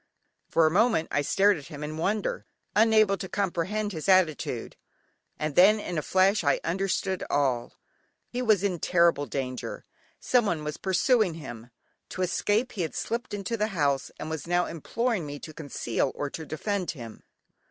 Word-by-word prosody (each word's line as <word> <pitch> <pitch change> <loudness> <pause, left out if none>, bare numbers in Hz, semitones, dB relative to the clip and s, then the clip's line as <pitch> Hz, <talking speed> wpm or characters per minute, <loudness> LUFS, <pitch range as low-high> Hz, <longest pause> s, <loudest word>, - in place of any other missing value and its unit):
For 165 - +4
a 155 - +3
moment 210 -3 +2
I 145 - +2
stared 195 +6 +3
at 145 - -10
him 150 0 -8
in 150 +1 -4
wonder, 200 +6 -1 0.3
unable 215 -2 +5
to 190 0 -6
comprehend 205 +2 -1
his 160 +1 -4
attitude; 160 -10 +2 0.6
and 155 -1 -2
then 205 +4 +7
in 175 -5 -3
a - - -2
flash 190 +5 +3
I 140 - +2
understood 190 +1 -1
all. 130 -4 0 0.5
He 250 - -4
was 215 -6 +3
in 185 -4 0
terrible 170 -5 +3
danger, 130 -2 -4 0.3
someone 205 -11 +1
was 150 0 -4
pursuing 190 0 +2
him; 120 -7 -9 0.4
to 185 - -3
escape 210 +6 +1
he 200 - -4
had 160 - -3
slipped 235 +2 -3
into 205 +2 -3
the 210 0 +1
house, 140 -3 +1
and - - -5
was 160 +1 -5
now 175 0 +2
imploring 225 - -2
me 145 0 -6
to 155 - -10
conceal 140 -4 -2
or 145 -1 -3
to 160 -2 -7
defend 185 +2 -2
him. 115 -3 -9
175 Hz, 170 wpm, -27 LUFS, 150-205 Hz, 0.6 s, then